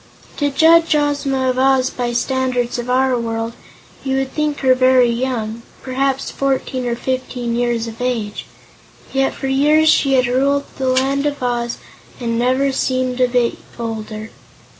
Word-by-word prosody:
To 290 -1 +1
judge 325 +3 +4
Ozma 280 -3 +1
of 255 - -3
Oz 265 -1 +3
by 245 -1 -3
the 240 - -4
standards 250 -1 -1
of 240 +1 -5
our 260 0 +2
world, 225 0 -3 0.5
you 265 -1 -1
would 270 0 -2
think 300 -1 -1
her 260 -1 +5
very 255 -1 +4
young 235 -2 -3 0.2
perhaps 270 +1 -1
fourteen 260 -2 -1
or 235 - 0
fifteen 250 -1 -3
years 240 -1 0
of 230 +1 -8
age 235 -5 -3 0.7
yet 270 0 +1
for - - -6
years 300 +4 +3
she 275 -3 +3
had 255 -1 +4
ruled 275 +3 +1 0.2
the 265 - -1
Land 270 +2 +1
of 285 -3 -4
Oz 240 -1 -1 0.4
and 235 -2 -2
had 230 - 0
never 270 +2 +1
seemed 255 -1 -1
a 250 - +5
bit 245 -1 0 0.2
older. 220 -1 -5
255 Hz, 165 wpm, -18 LUFS, 240-270 Hz, 0.7 s, her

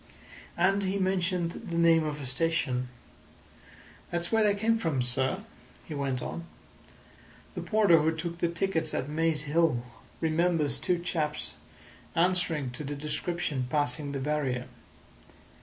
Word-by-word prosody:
And 195 +1 +3
he 190 +1 0
mentioned 185 -2 +1
the 170 0 -5
name 165 -1 +5
of 150 -1 -3
a 140 - -6
station. 130 -2 0 1.2
"That's 175 0 -2
where 225 -1 +4
they 205 -1 +3
came 225 +2 +2
from, 150 - 0
sir," 130 +2 0 0.4
he 155 - -7
went 135 -3 -2
on. 170 - -5 1.1
"The - - -4
porter 205 -6 +4
who 155 +1 +2
took 170 +1 -4
the 170 - +2
tickets 170 -2 -1
at 130 - -1
Maze 155 0 +1
Hill 155 -5 +2 0.4
remembers 160 -2 +2
two 180 - +1
chaps 160 -3 -2 0.6
answering 170 -6 +2
to 125 - -7
the 145 +1 -4
description 150 -2 -2
passing 145 0 0
the 140 - -3
barrier. 135 -3 -1
160 Hz, 140 wpm, -29 LUFS, 145-175 Hz, 1.2 s, name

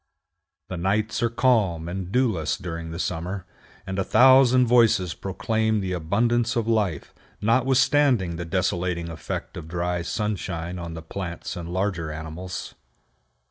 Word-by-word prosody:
The 90 - -4
nights 105 +7 0
are 115 - +2
calm 110 -9 +2
and 90 +1 -5
dewless 95 - +1
during 85 -2 -6
the 80 - -6
summer, 90 +2 -3 0.4
and 95 0 -3
a - - +2
thousand 130 +2 +6
voices 115 -8 +4
proclaim 110 +3 -1
the 95 -2 -3
abundance 115 +8 +1
of 115 -2 0
life, 105 -9 0 0.3
notwithstanding 130 -3 +3
the 85 +1 -5
desolating 85 -1 -1
effect 80 - -6
of 80 -2 -7
dry 90 +1 -2
sunshine 90 -3 -3
on 85 -1 -6
the 80 - -7
plants 85 +1 -5
and 85 -1 -6
larger 90 -4 -1
animals. 80 +4 -6
95 Hz, 140 wpm, -25 LUFS, 85-115 Hz, 0.4 s, thousand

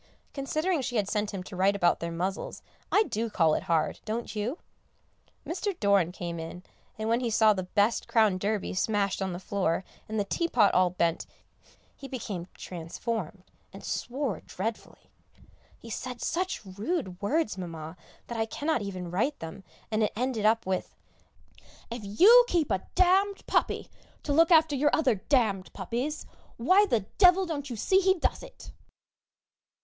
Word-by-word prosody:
Considering 310 +4 -1
she 245 -1 -4
had 205 -3 +1
sent 210 0 -1
him 190 -2 -5
to 190 - -9
write 195 +2 +3
about 175 -3 +2
their 170 0 -4
muzzles, 185 +4 -4 0.3
I 420 - +5
do 230 - -3
call 165 -6 +3
it - - -1
hard, 160 -2 +1
don't 225 +1 -4
you? 225 +9 -2 0.9
Mr. 370 +2 -3
Doran 200 -4 +3
came 170 -2 -5
in, 165 +2 -7 0.3
and 215 0 -3
when 230 +1 +2
he 245 -2 -1
saw 220 -1 +5
the 190 - -3
best 205 +5 +1
Crown 220 -5 +3
Derby 205 +1 -1
smashed 200 0 0
on 190 -1 -1
the 175 - -5
floor, 185 -2 -1 0.3
and 220 0 -1
the - - +2
teapot 225 - +2
all 185 0 +4
bent, 170 -1 -1 0.7
he 275 - -9
became 210 -10 -5
quite - - -34
transformed, 180 +2 -5 0.3
and 195 - -11
swore 260 -2 -3
dreadfully. 220 +4 -6 0.7
He 230 - -11
said 250 +2 -5
such 365 - -2
rude 200 - -3
words, 280 +5 0
Mamma, 165 -3 -7 0.3
that 235 -1 -5
I 225 - 0
cannot 290 +1 -1
even 185 -4 -5
write 245 +11 0
them, 165 +4 -8 0.3
and 215 0 +1
it 215 - +1
ended 235 -2 0
up 225 +1 +2
with, 185 0 -2 1.0
"If 235 0 -4
you 390 - +7
keep 335 - +1
a 190 - +2 0.2
d - - +6 0.3
d - - -21
puppy - - 0 0.4
to 290 - -1
look 325 +3 +5
after 320 -3 +5
your 290 +2 +3
other 280 -6 +3
d 190 - -9
d 205 - +2
puppies, 245 - -3 0.3
why 370 - +4
the 235 - +2 0.2
devil 370 0 +6
don't 290 -5 -4
you 240 - -4
see 380 - +3
he 380 0 +3
does - - -1
it!" - - -12
215 Hz, 175 wpm, -28 LUFS, 190-275 Hz, 1.0 s, you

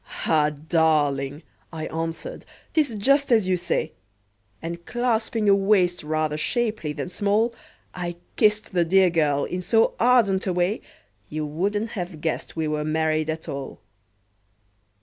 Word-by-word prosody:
"Ah! 150 -2 +3
darling," 150 -2 +1 0.3
I 160 -2 -5
answered, 165 - -4 0.3
"'tis 295 -8 +1
just 275 +7 +2
as 220 -5 +4
you 185 - +3
say;" 175 -1 -1 0.7
And 170 +1 -6
clasping 230 -2 0
a 200 - +7
waist 195 -3 +3
rather 155 0 -1
shapely 215 -5 -1
than 150 - -4
small, 210 +4 +1 0.4
I 175 -1 -4 0.2
kissed 210 -2 +2
the 175 -2 +3
dear 185 +1 +4
girl 150 -4 +2
in 180 - -4
so 225 +5 +3
ardent 225 -6 +3
a 185 - +1
way 180 +4 0 0.5
You 155 0 -3
wouldn't 205 +9 -1
have 175 -4 -5
guessed 160 0 -3
we 160 -1 -1
were 150 0 -1
married 155 0 0
at 160 0 -4
all! 140 -1 -6
175 Hz, 145 wpm, -24 LUFS, 155-210 Hz, 0.7 s, a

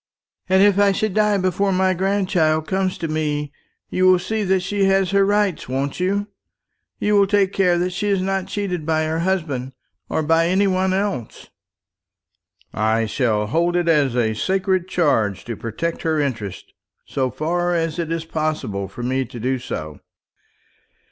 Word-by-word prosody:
And 190 +1 +5
if 205 -1 +4
I 200 -1 +4
should 215 0 -1
die 210 0 +3
before 190 +1 0
my 185 0 +2
grandchild 180 -4 +1
comes 190 0 -1
to 165 - -3
me, 150 -2 -2 0.4
you 185 0 +3
will 185 0 +6
see 215 +4 -2
that 190 0 +2
she 195 +2 0
has 195 -1 +2
her 200 0 +4
rights, 205 -7 0
won't 135 +4 -2
you? 200 +3 0 0.7
You 210 - 0
will 200 -1 +5
take 200 -1 +2
care 180 -3 +3
that 180 +1 -1
she 205 +3 -2
is 200 -2 +2
not 190 0 -1
cheated 190 -4 -3
by 160 0 +1
her 160 +1 -1
husband, 155 -8 -2 0.4
or 160 - 0
by 165 +2 +3
any 190 +3 +2
one 190 -1 +1
else?" 190 - -3 1.2
"I 110 +1 +1
shall 110 -2 0
hold 170 +10 0
it 175 -1 +1
a 130 -8 +2
sacred 185 - 0
charge 115 - +1
to 115 - -4
protect 140 +11 -4
her 160 -1 0
interests, 115 -9 -4 0.3
so 130 -1 -1
far 175 +7 -1
as 165 0 -1
it 165 -1 -2
is 165 -1 -2
possible 155 -12 -2
for 120 - -8
me 130 +2 0
to 120 +1 -9
do 130 +3 -1
so." 75 - -6
175 Hz, 170 wpm, -21 LUFS, 140-190 Hz, 1.2 s, will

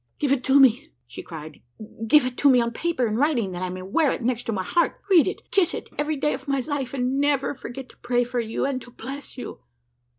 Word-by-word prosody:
"Give 285 -3 0
it 270 -3 +1
to 270 +1 +5
me!" 270 +3 +4 0.2
she 370 - -9
cried; 160 - -10 0.5
"give 295 +3 +6
it 255 -1 -3
to 285 - +5
me 255 -2 +6
on 235 0 0
paper, 320 0 -1
in 215 -1 -1
writing, 250 -8 +1
that 175 0 -6
I 185 - -2
may 185 0 -6
wear 275 - +2
it - - -4
next 240 -1 -1
my 190 -3 -2
heart, 340 - +1
read 340 -6 +6
and 385 - -3
kiss 380 -4 +2
it - - -7
every 300 +1 0
day 295 +1 0
of - - -7
my 275 -1 +1
life, 275 -2 -3
and 255 +1 0
never 285 -1 +1
forget 255 0 -8
to - - -19
pray 245 0 +1
for 245 0 -3
you, 225 +1 -2
and 270 -2 -2
to 245 - -12
bless 270 +4 -8
you!" 250 - -7
260 Hz, 245 wpm, -24 LUFS, 235-285 Hz, 0.5 s, give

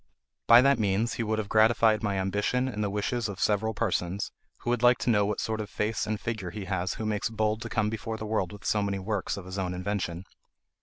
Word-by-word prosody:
By 120 +2 +9
that 140 -2 +4
means 105 +3 +1
he - - -3
would 110 0 -1
have 110 -2 -2
gratified 110 0 +4
my 100 -3 -1
ambition 105 +7 0
and 105 -5 -3
the 100 - 0
wishes 105 +3 -1
of 100 0 -7
several 110 +1 +1
persons, 95 0 -1 0.3
who 120 - -1
would 120 -2 0
like 120 0 +6
to 120 - +1
know 105 -2 +3
what 105 - -2
sort 110 -1 -2
of 105 - -6
face 105 +2 -1
and 110 -1 -2
figure 110 -6 -4
has 95 -2 -3
he - - -12
who 110 - -4
makes 105 0 -1
bold 110 0 0
to 115 - -5
come 110 -2 0
before 110 0 -4
the 110 - -6
world 105 -5 -1
with 105 -1 -11
so 105 - +2
many 100 -1 -1
works 100 +1 -2
of 100 - -7
his 95 +1 -5
own 90 -1 -2
invention. 90 -2 -3
105 Hz, 245 wpm, -28 LUFS, 100-110 Hz, 0.3 s, By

